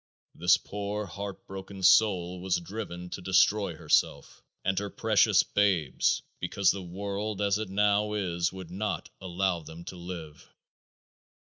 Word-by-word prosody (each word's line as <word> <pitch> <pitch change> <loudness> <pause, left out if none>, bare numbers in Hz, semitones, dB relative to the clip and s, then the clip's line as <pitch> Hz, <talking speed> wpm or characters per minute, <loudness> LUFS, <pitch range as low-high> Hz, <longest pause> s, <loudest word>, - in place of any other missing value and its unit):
This 90 +2 +4
poor 105 +1 -4
heart 100 +2 -7
broken 95 0 -8
soul 90 -2 +4
was 95 -1 +1
driven 90 -2 -7
to - - -5
destroy 95 +3 +3
herself - - 0 0.2
and 95 0 +1
her 100 0 -4
precious 110 -2 +3
babes 95 -9 +1 0.2
because 100 -2 +2
the 100 - -5
world 100 +3 -4
as 100 0 +1
it 110 -3 -4
now 105 +1 +2
is 90 -4 -1
would 95 -2 -9
not 105 +4 -3
allow 95 -1 0
them 80 +2 -10
to 90 - -8
live. 85 -4 -8
95 Hz, 140 wpm, -29 LUFS, 90-100 Hz, 0.2 s, This